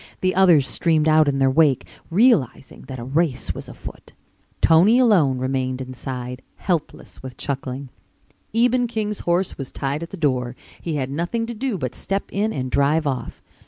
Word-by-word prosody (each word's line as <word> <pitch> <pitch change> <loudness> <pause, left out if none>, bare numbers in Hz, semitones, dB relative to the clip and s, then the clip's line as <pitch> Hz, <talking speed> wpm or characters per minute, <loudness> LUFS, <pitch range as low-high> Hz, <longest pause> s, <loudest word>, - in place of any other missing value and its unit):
The 185 0 +1
others 175 -8 +5
streamed 160 -2 +1
out 155 -1 +5
in 140 -1 +1
their 135 -1 +3
wake, 135 -3 +3 0.2
realizing 170 - +2
that 130 - -6
a 120 - -6
race 145 +2 -1
was - - -9
afoot. - - -11 0.5
Tony 175 +9 +5
alone 185 - +4
remained 130 0 -2
inside, 125 -1 -6
helpless 170 -5 -4
with 130 -1 -9
chuckling. 135 -1 -4 0.6
Eben 245 +2 +2
King's 215 -3 -3
horse 175 0 -1
was 135 - -5
tied 140 +3 -3
at 170 - -6
the 195 - -8
door. 130 -6 0 0.3
He 165 -3 -3
had 135 -2 -2
nothing 175 +10 -2
to 235 - -5
do 235 -1 -2
but 130 -6 -4
step 195 0 -2
in 210 +2 0
and 130 -6 -4
drive 145 +3 +2
off. 135 -3 -4
150 Hz, 170 wpm, -22 LUFS, 130-190 Hz, 0.6 s, others